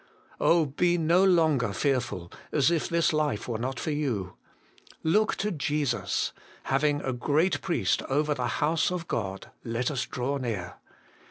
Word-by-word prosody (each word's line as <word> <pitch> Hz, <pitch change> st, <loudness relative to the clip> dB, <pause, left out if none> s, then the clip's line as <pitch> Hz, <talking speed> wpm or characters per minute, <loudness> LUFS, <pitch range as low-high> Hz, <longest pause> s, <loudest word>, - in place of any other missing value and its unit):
Oh, 165 Hz, -1 st, +4 dB
be 175 Hz, +5 st, +1 dB
no 170 Hz, +3 st, +3 dB
longer 160 Hz, -, +3 dB
fearful, 125 Hz, -10 st, -1 dB, 0.2 s
as 145 Hz, +1 st, +3 dB
if 165 Hz, -3 st, 0 dB
this 170 Hz, -1 st, +2 dB
life 150 Hz, -8 st, 0 dB
were 115 Hz, -3 st, -2 dB
not 125 Hz, +1 st, -3 dB
for 155 Hz, -, -2 dB
you! 120 Hz, -12 st, -2 dB, 0.7 s
Look 210 Hz, +7 st, +2 dB
to 210 Hz, +1 st, -2 dB
Jesus; 145 Hz, -5 st, -1 dB, 0.3 s
having 145 Hz, +2 st, +1 dB
a 130 Hz, -, -2 dB
Great 150 Hz, +9 st, +1 dB
Priest 175 Hz, -, +1 dB
over 150 Hz, +2 st, +1 dB
the 125 Hz, -3 st, -2 dB, 0.2 s
House 155 Hz, +2 st, +2 dB
of 180 Hz, -2 st, -4 dB
God, 95 Hz, -3 st, -4 dB
let 120 Hz, +4 st, -1 dB
us 135 Hz, -4 st, -2 dB
draw 130 Hz, +3 st, -2 dB
near. 105 Hz, -9 st, -4 dB
145 Hz, 155 wpm, -27 LUFS, 125-160 Hz, 0.7 s, Oh